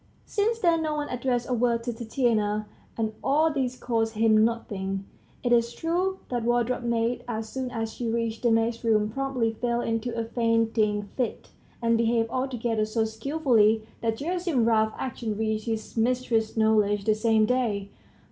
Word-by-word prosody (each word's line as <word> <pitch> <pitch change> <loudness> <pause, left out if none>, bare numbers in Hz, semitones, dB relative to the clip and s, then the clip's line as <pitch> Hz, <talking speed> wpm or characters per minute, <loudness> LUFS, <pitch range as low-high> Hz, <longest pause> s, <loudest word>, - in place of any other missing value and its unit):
Since 445 +2 0
then 340 -6 +2
no 310 -1 -1
one 295 -1 -3
addressed 245 -1 -1
a 255 - -1
word 235 -1 +1
to 240 0 -2
Tatiana. 220 -3 0 0.3
And 220 -1 -1
all 310 +3 +3
this 255 -3 -1
cost 225 -2 -1
him 215 0 +4
nothing. 195 -4 -2 0.4
It 245 - 0
is 235 0 +3
true 360 +4 -1
the 245 - 0
wardrobe 240 +1 +1
maid, 235 0 0
as 220 -2 -4
soon 260 -1 -3
as 225 -2 -4
she 240 -2 -3
reached 230 -1 -2
the 240 - +3
maids' 225 +1 +1
room, 215 -2 +2
promptly 255 -3 -1
fell 235 +1 -1
into 230 0 -2
a 230 - -1
fainting 225 -2 +1
fit, 250 -4 -3 0.3
and 230 0 +3
behaved 230 0 +1
altogether 240 -4 -1
so 220 +1 0
skilfully 225 -2 +2 0.2
that 225 -1 0
Gerasim's 340 -4 0
rough 220 -1 +3
action 230 -4 -4
reached 220 -1 -1
his 220 -1 -4
mistress's 230 -1 0
knowledge 210 -2 +3
the 215 - +4
same 220 0 +3
day. 215 -5 0
230 Hz, 165 wpm, -26 LUFS, 220-250 Hz, 0.4 s, him